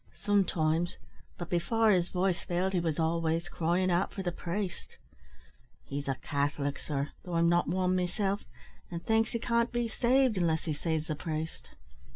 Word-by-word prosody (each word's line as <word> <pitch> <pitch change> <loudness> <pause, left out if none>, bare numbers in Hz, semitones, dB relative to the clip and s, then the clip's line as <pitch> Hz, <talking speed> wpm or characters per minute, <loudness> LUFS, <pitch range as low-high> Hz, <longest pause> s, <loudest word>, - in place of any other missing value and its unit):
"Sometimes; 175 -5 +1 0.4
but 175 - -5
before 210 +6 +2
his 180 -2 +2
voice 180 -1 0
failed 180 +2 -1
he 180 - +2
was 165 -3 -1
always 165 +1 +1
cryin' 175 +2 +1
out 175 +3 +1
for 195 - -5
the 175 - 0
priest. 180 +2 -4 0.9
He's 140 0 -5
a 135 - +1
Catholic, 145 +1 -1
sir, 145 -1 -2
though 180 - -6
I'm 170 0 +4
not 175 0 +3
wan 185 0 +1
meself 195 +3 0 0.5
and 170 -1 -6
thinks 225 0 +3
he - - +1
can't 235 0 +1
be 240 -1 0
saved 245 -1 +3
unless 160 -2 +1
he 160 - -1
sees 160 +1 -1
the 155 - -2
priest." 155 +1 -5
175 Hz, 170 wpm, -31 LUFS, 160-195 Hz, 0.9 s, I'm